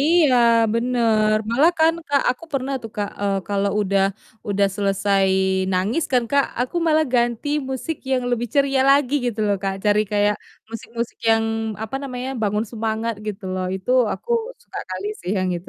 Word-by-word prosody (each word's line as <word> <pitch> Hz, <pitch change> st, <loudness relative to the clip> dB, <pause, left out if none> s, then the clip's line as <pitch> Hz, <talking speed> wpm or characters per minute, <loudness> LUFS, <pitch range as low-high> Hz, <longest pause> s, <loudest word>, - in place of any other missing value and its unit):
Iya, 305 Hz, -3 st, +4 dB, 0.4 s
bener. 230 Hz, -3 st, +2 dB
Malah 275 Hz, +8 st, +5 dB
kan, 325 Hz, +1 st, +4 dB
Kak, 285 Hz, -2 st, +2 dB
aku 295 Hz, -, -13 dB
pernah 275 Hz, 0 st, -2 dB
tuh, 225 Hz, -, -6 dB
Kak, 205 Hz, -1 st, -2 dB
eee, 200 Hz, -1 st, +1 dB
kalau 200 Hz, 0 st, 0 dB
udah 195 Hz, -1 st, +2 dB, 0.5 s
udah 200 Hz, 0 st, +2 dB
selesai 195 Hz, -1 st, +1 dB, 0.5 s
nangis 200 Hz, -, 0 dB
kan, 245 Hz, -2 st, +3 dB
Kak, 280 Hz, -1 st, +4 dB, 0.2 s
aku 255 Hz, +7 st, -2 dB
malah 315 Hz, -1 st, +4 dB
ganti 240 Hz, +3 st, +1 dB, 0.2 s
musik 280 Hz, +4 st, -3 dB
yang 255 Hz, -1 st, +1 dB
lebih 240 Hz, -1 st, -1 dB
ceria 275 Hz, -1 st, +3 dB
lagi 280 Hz, -1 st, +3 dB
gitu 225 Hz, -2 st, -2 dB
loh, 200 Hz, -1 st, +2 dB
Kak, 195 Hz, 0 st, -1 dB
cari 210 Hz, 0 st, +4 dB
kayak 205 Hz, 0 st, +3 dB, 0.3 s
musik-musik 230 Hz, +1 st, -6 dB
yang, 225 Hz, 0 st, +4 dB, 0.4 s
apa 220 Hz, +5 st, -4 dB
namanya, 255 Hz, -1 st, -5 dB
bangun 210 Hz, +1 st, 0 dB
semangat 225 Hz, 0 st, -2 dB
gitu 205 Hz, -1 st, -5 dB
loh. 185 Hz, 0 st, -2 dB
Itu 190 Hz, +6 st, -6 dB, 0.2 s
aku 475 Hz, -, -8 dB, 0.3 s
suka -, -, -7 dB
kali 185 Hz, +2 st, -4 dB
sih 180 Hz, +2 st, -5 dB
yang 185 Hz, -1 st, 0 dB
itu. 170 Hz, -, -10 dB
230 Hz, 170 wpm, -22 LUFS, 200-265 Hz, 0.5 s, Malah